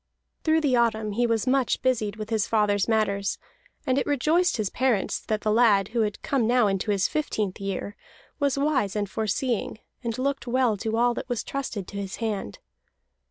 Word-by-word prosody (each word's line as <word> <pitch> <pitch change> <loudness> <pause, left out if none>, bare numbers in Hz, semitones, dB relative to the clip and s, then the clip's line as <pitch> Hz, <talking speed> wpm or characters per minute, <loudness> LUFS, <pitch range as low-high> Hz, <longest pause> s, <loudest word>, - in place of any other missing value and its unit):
Through 320 0 +3
the 275 -4 +2
autumn 220 -3 +1
he 240 +4 +1
was 230 -1 0
much 260 -1 +1
busied 220 -5 +1
with 215 +1 -7
his 215 -2 +1
father's 205 -3 +2
matters; 200 -3 +1 0.5
and 260 +1 +2
it - - -2
rejoiced 310 +5 +2
his 210 -4 -1
parents 250 -6 +1
that 215 -1 -2
the 215 - +1
lad, 210 -4 +4
who 230 +1 0
had 210 -1 -2
come 260 -6 +1
now 245 -1 +4
into 195 +1 -1
his 200 -2 +2
fifteenth 215 -10 -2
year, 195 +1 -4 0.4
was 280 -2 +1
wise 275 -9 +1
and 205 -1 -1
foreseeing, 220 +3 -2 0.3
and 230 -1 -3
looked 275 0 -2
well 245 -2 +2
to 225 +2 -2
all 240 +1 +3
that 245 - -6
was 245 -2 -1
trusted 245 -8 -4
to 200 - -7
his 195 -1 -5
hand. 210 - -3
225 Hz, 190 wpm, -26 LUFS, 205-255 Hz, 0.5 s, lad